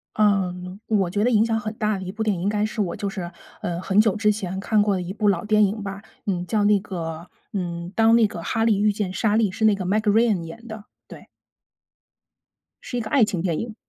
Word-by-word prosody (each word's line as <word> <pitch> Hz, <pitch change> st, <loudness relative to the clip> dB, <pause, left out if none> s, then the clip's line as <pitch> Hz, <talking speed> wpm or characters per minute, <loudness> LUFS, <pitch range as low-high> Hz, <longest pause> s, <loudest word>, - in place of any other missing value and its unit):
嗯， 190 Hz, -2 st, 0 dB
我 200 Hz, -5 st, +2 dB
觉 205 Hz, +3 st, 0 dB
得 245 Hz, -, +3 dB
影 220 Hz, -2 st, +4 dB
响 225 Hz, -1 st, 0 dB
很 215 Hz, 0 st, -4 dB
大 215 Hz, -2 st, 0 dB
的 190 Hz, -, -6 dB
一 185 Hz, -, -5 dB
部 215 Hz, +3 st, -4 dB
电 210 Hz, -2 st, +1 dB
影 170 Hz, -, -5 dB
应 195 Hz, -, 0 dB
该 210 Hz, 0 st, +1 dB
是 215 Hz, 0 st, -5 dB
我 180 Hz, -4 st, -1 dB
就 200 Hz, -, -3 dB
是， 180 Hz, -3 st, -5 dB, 0.3 s
呃， 175 Hz, 0 st, -2 dB
很 195 Hz, +2 st, +3 dB
久 215 Hz, -2 st, +3 dB
之 210 Hz, 0 st, +3 dB
前 190 Hz, -3 st, -4 dB
看 210 Hz, +2 st, +2 dB
过 205 Hz, -2 st, +1 dB
的 180 Hz, -, -2 dB
一 180 Hz, +1 st, -5 dB
部 210 Hz, +1 st, 0 dB
老 185 Hz, -4 st, +1 dB
电 210 Hz, 0 st, +4 dB
影 205 Hz, +2 st, -1 dB
吧。 195 Hz, 0 st, -6 dB, 0.2 s
嗯， 180 Hz, -3 st, -1 dB
叫 210 Hz, 0 st, +1 dB
那 205 Hz, 0 st, +5 dB
个， 170 Hz, -3 st, -6 dB, 0.2 s
嗯， 175 Hz, -3 st, -4 dB
《当 225 Hz, +1 st, +5 dB
那 230 Hz, -2 st, +5 dB
个 175 Hz, -5 st, -7 dB
哈 225 Hz, +5 st, 0 dB
利 220 Hz, -3 st, +3 dB
遇 210 Hz, 0 st, +3 dB
见 200 Hz, -3 st, -3 dB
莎 210 Hz, +1 st, +1 dB
莉》， 220 Hz, -2 st, +3 dB
是 220 Hz, -, -2 dB
那 215 Hz, -1 st, +5 dB
个 190 Hz, -2 st, -4 dB
Meg 205 Hz, +4 st, +2 dB
Ryan 215 Hz, -3 st, +3 dB
演 165 Hz, +9 st, -10 dB
的， 220 Hz, -2 st, -8 dB, 0.2 s
对。 -, -, -12 dB, 1.6 s
是 245 Hz, -, -5 dB
一 -, -, 0 dB
个 220 Hz, -1 st, -5 dB
爱 270 Hz, -5 st, +5 dB
情 190 Hz, -4 st, -2 dB
电 170 Hz, -4 st, -1 dB
影， 225 Hz, -1 st, -5 dB
205 Hz, 290 characters per minute, -23 LUFS, 185-215 Hz, 1.6 s, 那